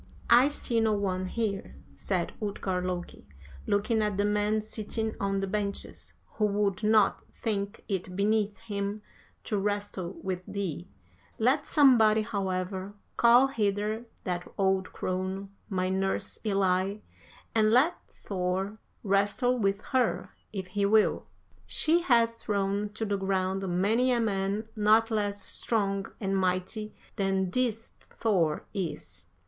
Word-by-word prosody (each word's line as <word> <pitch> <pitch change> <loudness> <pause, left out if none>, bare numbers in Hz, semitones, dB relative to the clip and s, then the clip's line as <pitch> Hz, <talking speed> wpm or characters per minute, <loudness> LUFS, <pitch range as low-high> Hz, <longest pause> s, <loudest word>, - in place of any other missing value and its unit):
"'I 245 +3 +8
see 250 -5 0
no 220 -1 +3
one 185 -2 -1
here,' 205 -1 -3 0.2
said 180 -3 -2
Utgard 190 -3 -2
Loki, 175 - -5 0.4
looking 215 +2 +1
at 210 -2 0
the 205 - +2
men 210 +1 +1
sitting 220 +1 -3
on 195 0 0
the - - 0
benches, 200 0 -4
'who 215 - -1
would 200 -1 0
not 215 -2 +3
think 200 -3 -3
it 185 -2 -3
beneath 210 +1 +1
him 205 -1 -4 0.4
to 210 - -1
wrestle 205 -3 -2
with 185 -1 -3
thee; 180 -4 -4 0.5
let 270 +6 +2
somebody, 225 -7 +5
however, 190 -1 -3 0.2
call 240 +2 +6
hither 215 -2 -1 0.2
that 175 -1 -2
old 190 -1 +1
crone, 190 +2 -3 0.2
my 185 -2 0
nurse 190 +1 -1
Elli, 195 -1 +1 0.5
and 215 -1 +4
let 255 +10 +4 0.3
Thor 190 +2 -2 0.2
wrestle 205 +5 +2
with 200 -1 +1
her 255 -2 0 0.2
if 195 -3 -4
he 200 +2 -1
will. 215 +2 +3 0.4
She 330 +3 +3
has 230 -7 +3
thrown 200 -1 -1
to 225 - -2
the 200 -1 0
ground 190 0 -1
many 230 +6 +3
a 240 - +2
man 205 0 -1
not 220 +2 +4
less 205 -2 -1
strong 195 -3 -1
and 195 -2 -1
mighty 190 +3 -1 0.2
than 190 -2 0
this 230 -1 -1
Thor 180 -9 0
is.' 190 -5 -5
205 Hz, 130 wpm, -29 LUFS, 195-220 Hz, 0.5 s, I